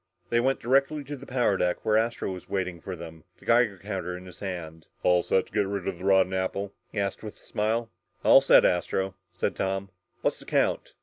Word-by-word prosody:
They 120 - +4
went 135 +3 +1
directly 140 +4 +2
to 145 +1 -6
the 140 0 -12
power 125 -6 +2
deck 90 -1 -1
where 105 - +3
Astro 115 -2 0
was 90 -1 -8
waiting 90 -3 -2
for 95 - -5
them, 80 -2 -10
the - - -19
Geiger 115 -4 +3
counter 95 -2 -4
in 90 - -11
his 90 -1 -12
hand. 85 -5 -6 0.2
"All 90 -1 +4
set 95 - +1
to - - -22
get 105 -1 +1
rid 100 -2 -3
of 95 -3 -3
the 95 - -7
rotten 95 -1 +4
apple?" 95 +1 -2 0.2
he 105 - -3
asked 100 -1 -2
with 105 -1 -8
a - - -24
smile. 115 +2 -1 0.3
"All - - +8
set, - - +6
Astro," 95 +2 +1 0.2
said 100 - 0
Tom. 95 0 -2 0.3
"What's - - 0
the - - -13
count?" - - 0
95 Hz, 225 wpm, -27 LUFS, 90-110 Hz, 0.3 s, All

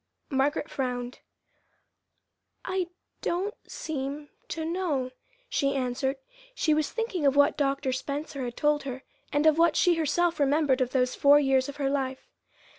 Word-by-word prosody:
Margaret 285 +3 +1
frowned. 250 -3 -3 1.5
"I 370 -1 -1 0.3
don't 380 +5 -1 0.2
seem 290 0 -4 0.2
to 320 0 -4
know," 320 -7 -1 0.4
she 275 - 0
answered. 265 +1 -1 0.4
She 310 - +2
was 305 -1 0
thinking 450 -8 -2
of 275 - +3
what 285 0 +5
Dr. 275 -2 0
Spencer 280 +1 -4
had 240 -1 -5
told 295 0 +2
her, 260 -1 -6 0.3
and 290 +1 +1
of 315 0 +5
what 335 -1 +4
she 355 -2 +4
herself 330 +1 +1
remembered 285 -1 +3
of 250 - +1
those 250 -1 +1
four 285 +1 +6
years 270 -1 +2
of 285 - -7
her 280 -2 -1
life. 265 -1 -2
285 Hz, 150 wpm, -28 LUFS, 265-315 Hz, 1.5 s, four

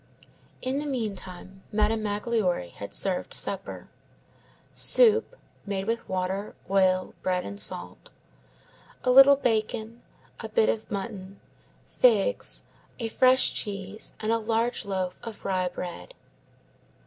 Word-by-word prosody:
In 260 +2 -1
the 295 - -4
meantime, 195 -6 -5
Madame 215 +1 +1
Magloire 205 - -1
had 100 - -8
served 190 -2 -1
supper: - - -2 0.9
soup, 455 0 +4 0.3
made 195 -1 -3
with 230 +1 -2
water, 190 +2 -2 0.2
oil, 185 -1 +2
bread, 180 -1 0
and 200 - -6
salt; - - -4 0.9
a 250 - +3
little 270 +2 +9
bacon, 225 -2 -1 0.4
a - - -6
bit 455 -2 +3
of 220 - -2
mutton, 195 -1 -6 0.5
figs, - - +2 0.3
a 230 -2 -3
fresh 255 +3 +4
cheese, 200 0 -5
and 215 +1 -1
a 230 - +2
large 225 +1 -1
loaf 185 -2 -3
of 230 -3 -9
rye 185 -2 +1
bread. 180 - -7
215 Hz, 120 wpm, -27 LUFS, 190-235 Hz, 0.9 s, little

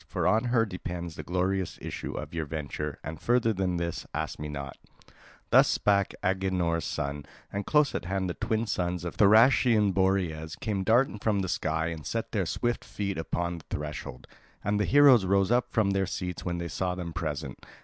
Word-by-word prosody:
For - - -2
on 110 +3 +3
her 120 -2 +3
depends 90 -3 -5
the 80 - -6
glorious 90 +1 -1
issue - - -5
of - - -6
your 80 -2 -3
venture. 75 -1 -4
And 80 +1 -7
further 120 -2 +2
than 95 -2 -1
this 85 -1 -3
ask - - -3
me 75 - -4
not." 70 -3 -6 0.8
Thus - - +7
spake 100 -1 +2
Agenor's 90 -3 0
son, 70 0 -3 0.3
and 100 0 -3
close 150 -1 +3
at - - -3
hand 95 +1 -1
the 90 - -2
twin 110 +5 -1
sons 90 -4 -2
of 85 - -4
Thracian 110 0 +5
Boreas 90 -5 0
came 100 -4 -2
darting 115 +1 +3
from 100 -1 +1
the 95 - -2
sky 80 -3 -1
and 80 -2 -6
set 115 +9 -3
their 95 -6 0
swift 120 +6 -1
feet 100 -4 -4
upon 85 +1 -2
the - - -18
threshold; 75 -3 -5 0.4
and 105 +1 0
the 105 - +2
heroes 140 -6 +7
rose 100 +2 +2
up 120 0 +3
from 105 -4 +2
their 95 -1 +1
seats 90 -1 -4
when 90 -1 -2
they 85 0 -3
saw 90 +1 -2
them 85 -2 -5
present. 75 -5 -4
95 Hz, 190 wpm, -28 LUFS, 85-105 Hz, 0.8 s, Thus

